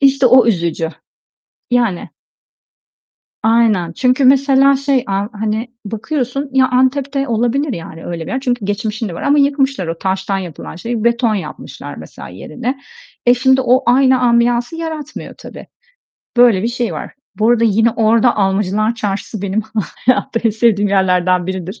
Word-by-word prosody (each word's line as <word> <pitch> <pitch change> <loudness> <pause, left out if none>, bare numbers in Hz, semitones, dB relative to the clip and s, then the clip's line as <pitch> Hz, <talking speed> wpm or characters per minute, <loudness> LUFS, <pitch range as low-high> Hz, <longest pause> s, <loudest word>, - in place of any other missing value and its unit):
İşte 275 -1 +4
o 250 0 +6
üzücü. 170 -5 0 0.8
Yani 235 -8 0 1.3
Aynen, 220 -7 +2
çünkü 255 +6 +1
mesela 275 +1 +4
şey, 275 -2 0
a 195 +1 -1
hani, 215 +3 -3 0.2
bakıyorsun 260 +5 -3
Ya, 260 -1 +3
Antep'te 275 +2 0
olabilir 245 +5 0
yani 165 -3 -8
öyle 165 -2 -5
bir - - -5
yer 260 - -1
çünkü 245 -5 -2
geçmişin 215 +2 -3
de 175 - -7
var - - -7
ama 290 +1 +3
yıkmışlar 275 - +1
o 165 0 -4
taştan 190 0 -2
yapılan 170 -3 -8
şeyi, 230 +3 -4
beton 235 -2 +2
yapmışlar 170 -7 -7
mesela - - -10
yerine. 235 - -5 0.5
E, 245 - +6
şimdi 260 +1 +3
o 255 +1 +3
aynı 260 +1 +4
ambiyansı 240 +3 +2
yaratmıyor 315 -2 -6
tabii. - - -11 0.7
Böyle 235 -6 +5
bir 230 - 0
şey 240 -1 -2
var. - - -7 0.2
Bu 215 +3 +2
arada 235 -1 +3
yine 225 +1 +3
orada 230 +2 +2
Almacılar 205 +2 0
Çarşı'sı 205 -1 -4
benim 200 +2 -1 0.4
hayatta 245 -2 +1
en 225 - +4
sevdiğim 210 -2 +2
yerlerden 185 -2 +2
biridir. 190 +3 -5
230 Hz, 150 wpm, -16 LUFS, 200-260 Hz, 1.3 s, o